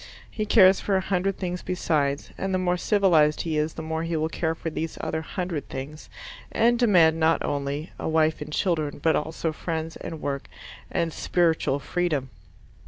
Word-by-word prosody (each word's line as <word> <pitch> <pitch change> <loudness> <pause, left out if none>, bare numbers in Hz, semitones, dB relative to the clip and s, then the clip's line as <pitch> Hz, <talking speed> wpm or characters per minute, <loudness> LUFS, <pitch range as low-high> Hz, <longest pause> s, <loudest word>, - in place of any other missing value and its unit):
He 215 -1 -3
cares 190 -3 +6
for 195 -2 +1
a - - +2
hundred 190 0 -1
things 180 -1 -3
besides, 150 -6 -1
and 190 -1 -2
the - - +2
more 180 -1 +1
civilized 175 -6 +3
he 160 -2 -1
is 150 +1 -1
the 160 - -6
more 160 0 -2
he 165 0 -2
will 155 +1 0
care 160 0 -1
for 165 0 -5
these 160 +1 -4
other 160 - -2
hundred 175 -2 -4
things, 145 +4 -7 0.4
and 235 +1 +3
demand 170 -9 +5
not 160 0 +2
only 145 +2 -3
a - - -2
wife 160 -1 +2
and 150 +1 -6
children, 155 -3 0
but 160 +2 +2
also 160 +1 -2
friends, 160 0 -4
and 165 -1 -7
work, 140 -2 -3 0.4
and 165 -1 -1
spiritual 165 -5 +1
freedom. 145 -3 -2
160 Hz, 180 wpm, -25 LUFS, 155-180 Hz, 0.4 s, cares